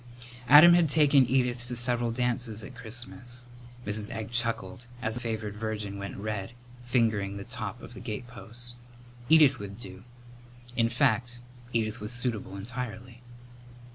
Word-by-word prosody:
Adam 155 +5 +10
had 170 -3 +4
taken 145 -3 +5
Edith 125 -2 +1
to 125 - -3
several 120 0 +1
dances 120 -2 -1
at 130 - -9
Christmas. 120 +1 -7 0.4
Mrs. 105 +1 -2
Egg 110 -1 -5
chuckled 115 -3 -1
as 110 -2 -2
the 120 - -3
favoured 110 -3 -3
virgin 105 -2 -4
went 100 0 -6
red, 105 +1 -4 0.3
fingering 110 -5 +1
the 100 - -6
top 115 -1 -6
of 120 - -10
the 120 - -9
gatepost. 120 +1 -6 0.6
Edith 150 -5 +6
would 100 +1 -8
do. 95 -3 -10 0.7
In 115 -1 +3
fact, 120 -1 +1 0.3
Edith 115 -1 -1
was 105 +1 -3
suitable, 120 -6 -2
entirely. 120 +2 -6
120 Hz, 140 wpm, -29 LUFS, 110-125 Hz, 0.7 s, Adam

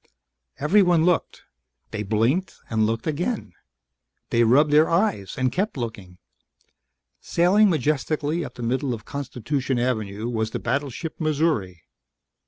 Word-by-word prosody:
Everyone 175 +1 +4
looked. 180 -1 0 0.5
They 105 - -3
blinked 115 - 0 0.2
and 110 -1 +2
looked 115 +1 -2
again. 175 +10 -2 0.8
They 115 - +4
rubbed 140 +6 +4
their 150 +2 +5
eyes 170 - 0
and 130 -1 +1
kept 195 - -2
looking. 105 -7 -6 1.0
Sailing 195 +5 +3
majestically 155 +1 0
up 125 -4 -8
the 120 - -7
middle 125 +2 0
of 110 -1 -13
Constitution 135 -1 -3
Avenue 110 -3 -2
was 110 -2 -1
the - - -4
battleship 140 +5 -3
Missouri. 145 - 0
135 Hz, 125 wpm, -24 LUFS, 115-160 Hz, 1.0 s, their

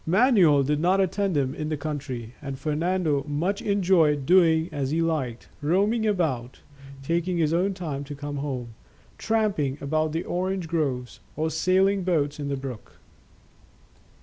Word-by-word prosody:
Manuel 185 - +5
did 150 +2 0
not 180 +4 +3
attend 190 -2 +1
him 135 -2 0
in 155 +1 -4
the 155 - -1
country, 135 -6 -5
and 135 -2 -5
Fernando 155 -1 0
much 170 +8 -1
enjoyed 175 -8 +2
doing 165 -1 +4
as 140 -3 -2
he 160 +3 0
liked, 150 -8 -2
roaming 205 +9 +2
about, 140 - -1 0.4
taking 170 +4 0
his 160 -1 +1
own 190 +3 +1
time 150 -6 -4
to 145 +1 -7
come 145 0 -5
home, 130 -5 -4 0.5
tramping 205 -12 0
about 155 +2 0
the 165 +2 -2
orange 185 0 -2
groves, 140 -7 -2 0.2
or 160 +1 -1
sailing 190 +3 +2
boats 150 -5 0
in 145 - -3
the 140 -1 -2
brook. 130 -5 -8
155 Hz, 150 wpm, -25 LUFS, 140-185 Hz, 0.5 s, Manuel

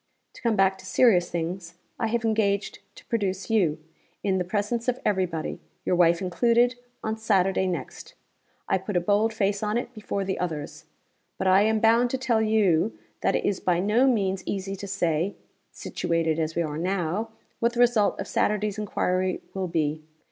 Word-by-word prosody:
To - - -14
come 230 -3 +1
back 190 -1 +2
to 185 - -13
serious 185 -5 +4
things, 170 +1 -4 0.2
I 225 - +1
have 230 +1 -1
engaged 210 -2 0 0.2
to - - -15
produce 200 -3 -2
you, 175 -9 +2 0.5
in 190 -2 +1
the - - +1
presence 210 +6 -2
of 250 0 0
every 190 -3 +2
body 160 -2 -5 0.3
your 180 - +2
wife 170 0 +3
included 235 +6 +3 0.3
on 220 0 -2
Saturday 195 -3 +2
next. 170 -8 -5 0.5
I - - +2
put 190 0 -2
a - - +5
bold 205 +5 +2
face 200 -2 0
on 210 +1 0
it 245 0 -4
before 210 -3 -3
the 190 -1 -2
others. 155 -2 -4 0.5
But - - -3
I 190 +1 +5
am 220 +1 +2
bound 230 +2 +4
to 265 - -1
tell 250 -4 +1
you 215 -3 +2 0.2
that - - +2
it - - -1
is 200 - 0
by 175 -2 +1
no 215 +8 +3
means 195 -6 +1
easy 195 0 -3
to 200 - -7
say 175 -1 0 0.4
situated 165 -1 -1
as 160 0 -2
we 170 - +1
are 150 -1 -4
now 185 +4 -1 0.3
what 235 +1 +1
the 240 - -4
result 240 -4 +3
of - - -4
Saturday's 210 0 0
inquiry 185 -3 -1
will 190 -1 -2
be. 155 -2 -1
195 Hz, 185 wpm, -26 LUFS, 175-220 Hz, 0.5 s, a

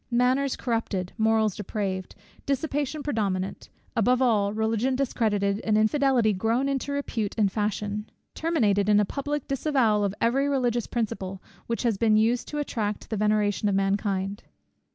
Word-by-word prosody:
Manners 255 +3 +2
corrupted, 225 -6 -2
morals 220 -2 +2
depraved, 195 -2 -4 0.3
dissipation 290 +1 -1
predominant, 200 -9 -2 0.3
above 245 +3 +3
all, 215 -6 +2
Religion 220 +4 0
discredited, 210 -6 0
and 215 -1 +1
infidelity 240 0 +3
grown 225 +7 0
into 275 0 -2
repute 235 -7 -2
and 205 -3 +2
fashion, 210 0 -2 0.2
terminated 210 - +1
in 210 - +5
the 210 - +4
public 290 +5 -3
disavowal 260 -7 +2
of 200 0 -1
every 270 +5 +2
religious 245 -4 0
principle, 195 -5 -3 0.3
which 230 +2 -2
had 225 -5 +1
been 220 -2 +4
used 230 +3 +2
to 295 - -5
attract 220 -9 -3
the - - 0
veneration 210 0 +1
of 195 - +1
mankind. 195 0 0
220 Hz, 145 wpm, -26 LUFS, 205-255 Hz, 0.3 s, in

